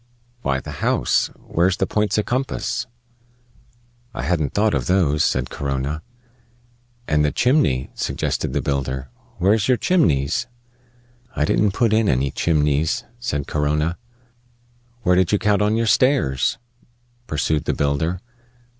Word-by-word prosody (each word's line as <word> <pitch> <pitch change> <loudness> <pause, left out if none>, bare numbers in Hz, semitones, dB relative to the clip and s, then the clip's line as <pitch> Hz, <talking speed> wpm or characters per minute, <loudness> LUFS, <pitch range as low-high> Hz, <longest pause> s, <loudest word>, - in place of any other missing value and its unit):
"Why, 70 - 0
the - - -8
house. - - +2
Where's 90 +2 0
the - - +1
points 105 0 0
o' 105 - +2
compass?" 125 0 -2 1.3
"I - - -4
hadn't 80 -5 -1
thought 105 +1 +2
of - - -1
those," 80 -6 +2
said 65 -1 0
Corona. 70 +2 -3 1.1
"And 75 -1 +2
the 75 - +2
chimney," 70 - +2
suggested - - -2
the 70 -1 -1
builder. 65 -2 -2 0.3
"Where's 100 +4 +2
your 130 -1 +3
chimneys?" 85 - +1 0.9
"I 75 - +1
didn't 100 +5 +2
put 115 -1 +2
in 110 -1 +3
any 65 +1 +1
chimneys," 75 -1 +1 0.2
said 75 - -2
Corona. 75 +3 -1 1.0
"Where 90 -2 +3
did 90 -1 +2
you 105 - +4
count 105 0 +2
on 105 +1 +2
your 115 0 +1
stairs?" 110 - +2 0.7
pursued 75 0 0
the - - 0
builder. 75 +5 -1
80 Hz, 135 wpm, -21 LUFS, 70-105 Hz, 1.3 s, you